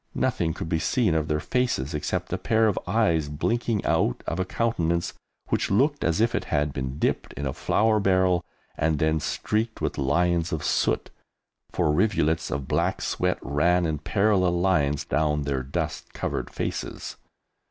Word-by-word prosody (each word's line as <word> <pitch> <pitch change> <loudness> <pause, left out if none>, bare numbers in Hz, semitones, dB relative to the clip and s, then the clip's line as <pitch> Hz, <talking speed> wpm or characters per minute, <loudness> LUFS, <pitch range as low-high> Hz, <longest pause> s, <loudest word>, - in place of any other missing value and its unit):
Nothing 80 -2 0
could - - -5
be 80 0 0
seen 115 -1 +1
of 80 -1 0
their 75 -1 0
faces 120 - -1
except 75 - -2
a - - -1
pair 110 0 +3
of 105 - +1
eyes 85 -7 +2
blinking 110 +8 -1
out - - +1
of 85 - -2
a 95 - +1
countenance 85 -6 0 0.4
which - - 0
looked 140 +9 +2
as 80 +2 +1
if 115 +1 +2
it - - -1
had 75 -2 0
been 65 0 -4
dipped - - -1
in 70 - -5
a 65 - -1
flour 110 0 +2
barrel 95 -3 +2 0.3
and 80 -1 +1
then 80 +1 +1
streaked 110 +8 -2
with - - -2
lines 85 +4 +1
of 80 -1 -2
soot, - - 0 0.6
for 75 - +1
rivulets 80 -3 +1
of 70 -3 -3
black - - 0
sweat - - 0
ran 85 +6 +2
in 80 -2 -1
parallel 95 -1 +2
lines 75 -6 +1
down 75 -1 +1
their 70 -2 -1
dust 65 +2 -4
covered - - -3
faces. - - -4
85 Hz, 170 wpm, -25 LUFS, 75-100 Hz, 0.6 s, pair